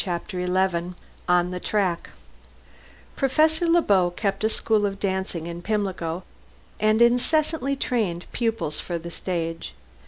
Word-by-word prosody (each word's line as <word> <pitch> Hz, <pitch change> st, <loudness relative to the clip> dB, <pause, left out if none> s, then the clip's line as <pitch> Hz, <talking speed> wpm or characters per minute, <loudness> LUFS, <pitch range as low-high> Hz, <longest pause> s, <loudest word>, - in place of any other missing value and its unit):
CHAPTER 180 Hz, 0 st, -3 dB
XI 180 Hz, -1 st, 0 dB, 0.3 s
ON 180 Hz, 0 st, +3 dB
THE 180 Hz, -, -3 dB
TRACK 185 Hz, -4 st, 0 dB, 1.1 s
Professor 310 Hz, +5 st, +2 dB
Le 335 Hz, 0 st, +4 dB
Beau 185 Hz, -3 st, +4 dB
kept 195 Hz, +3 st, -2 dB
a 220 Hz, -, +3 dB
school 215 Hz, -2 st, +1 dB
of 195 Hz, 0 st, -5 dB
dancing 190 Hz, -4 st, -2 dB
in 170 Hz, 0 st, -6 dB
Pimlico, 185 Hz, -4 st, -2 dB, 0.6 s
and 215 Hz, +2 st, +4 dB
incessantly 275 Hz, +3 st, +2 dB
trained 210 Hz, -10 st, -1 dB
pupils 225 Hz, -10 st, -1 dB
for 175 Hz, -, -3 dB
the 170 Hz, +1 st, -7 dB
stage. 165 Hz, -, -3 dB
190 Hz, 130 wpm, -25 LUFS, 175-225 Hz, 1.1 s, Le